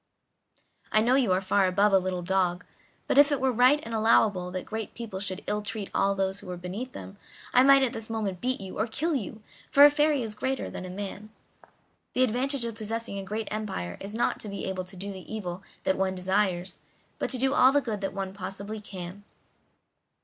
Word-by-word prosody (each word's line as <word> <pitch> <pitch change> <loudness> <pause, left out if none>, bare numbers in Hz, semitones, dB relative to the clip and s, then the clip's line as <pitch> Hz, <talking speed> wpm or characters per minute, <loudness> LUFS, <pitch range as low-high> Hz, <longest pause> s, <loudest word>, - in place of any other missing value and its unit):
"I 215 - +4
know 240 +3 +3
you 260 -7 +3
are 185 +1 +3
far 190 0 +3
above 200 +2 +3
a 195 - +7
little 185 -1 -3
dog, 180 0 0 0.4
but - - +4
if 290 +1 +7
it 285 - +1
were 265 0 +2
right 250 +5 +5
and 230 - -6
allowable 215 -4 +3
that 185 0 -5
great 220 -1 -5
people 225 -5 -6
should 190 -1 -4
ill 210 - -1
treat 210 -1 -5
all 200 0 +2
who 195 -1 -2
are 180 - -4
beneath 195 +9 -6
them, 195 - -9 0.4
I 250 - +7
might 275 0 +7
at 255 - 0
this 225 -1 -5
moment 210 -5 -3
beat 255 +1 0
you, 190 -2 -7
or 215 - +1
kill 315 +9 -1
you, 220 -4 -4 0.3
for 285 +1 +8
a 290 - +8
fairy 295 -2 +2
is 220 -2 -4
greater 260 +5 -2
than 185 - -6
a - - -7
man. 205 +2 -6 0.8
The 255 - +3
advantage 255 +2 0
of 230 - -3
possessing 220 -1 -4
a - - -5
great 215 +3 -4
empire 200 - -4
is 200 +2 -6
not 235 - 0
to 210 - -4
be 200 - -5
able 185 -1 -3
to 185 +2 -9
do 200 +2 -5
the 190 -1 -10
evil 185 -4 -4 0.2
that 190 - +1
one 190 0 +1
desires, 185 -1 0 0.4
but - - -1
to 260 - +1
do 265 +2 +2
all 260 -2 +6
the 285 - +4
good 225 -7 -4
that 195 - -2
one 190 -1 -3
possibly 200 +2 -6
can." 190 -1 -8
210 Hz, 220 wpm, -28 LUFS, 190-235 Hz, 0.8 s, for